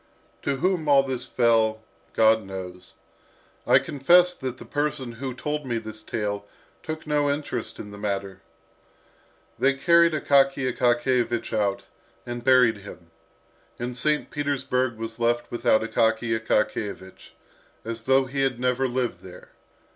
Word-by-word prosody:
To 140 - -1
whom 175 +1 0
all 140 -1 +6
this 130 -2 -4
fell, 110 -2 +2 0.3
God 110 0 +4
knows. 95 -2 -9 0.7
I - - +7
confess 175 +6 +4
that 130 -6 -6
the - - -11
person 145 -4 -2
who 130 +2 -6
told 150 +3 -3
me 120 -4 -2
this 110 -1 -7
tale 100 -2 -4 0.3
took 155 0 -6
no 150 -1 +1
interest 140 -5 -3
in 105 - -9
the 100 - -10
matter. 100 -2 -3 1.2
They 135 0 +3
carried 170 +3 +4
Akaky 135 -3 +2
Akakiyevich 120 -1 +1
out, 100 -2 0 0.4
and 120 0 -6
buried 125 -4 +5
him. 90 -4 -13 0.7
And 120 +1 -4
St. 150 +4 0
Petersburg 130 -4 -1
was 115 +1 -6
left 120 0 0
without 120 -2 +2
Akaky 115 0 +1
Akakiyevich, 105 -3 -2 0.5
as 115 0 -5
though 135 0 +4
he 135 +1 -3
had 135 -3 0
never 125 +1 +1
lived 125 -1 -2
there. 90 -1 -13
120 Hz, 140 wpm, -25 LUFS, 110-135 Hz, 1.2 s, I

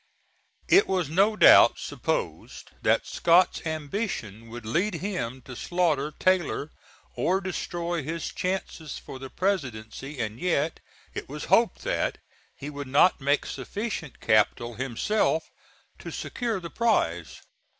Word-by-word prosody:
It 395 - +6
was 180 -6 0
no 200 +6 +3
doubt - - +8
supposed - - -4
that - - +2
Scott's 175 +2 +3
ambition 150 - -4
would 115 -1 -8
lead 175 - 0
him 145 - -4
to 125 - -9
slaughter 155 -2 0
Taylor 175 -5 +1 0.4
or 190 +2 +1
destroy 175 -2 -3
his 165 +3 -4
chances 180 -5 -3
for 130 - -9
the 135 0 -8
Presidency, 135 - -3
and 110 0 -3
yet 165 -2 0 0.3
it - - -6
was - - -6
hoped - - +3
that - - -1 0.4
he 140 - -8
would 145 -1 -6
not 145 +5 +4
make 140 +2 +2
sufficient 165 - -5
capital 110 +2 +2
himself 135 - 0 0.6
to - - -7
secure 235 -5 -3
the 170 -2 -8
prize. 90 - 0
160 Hz, 130 wpm, -27 LUFS, 130-185 Hz, 0.6 s, doubt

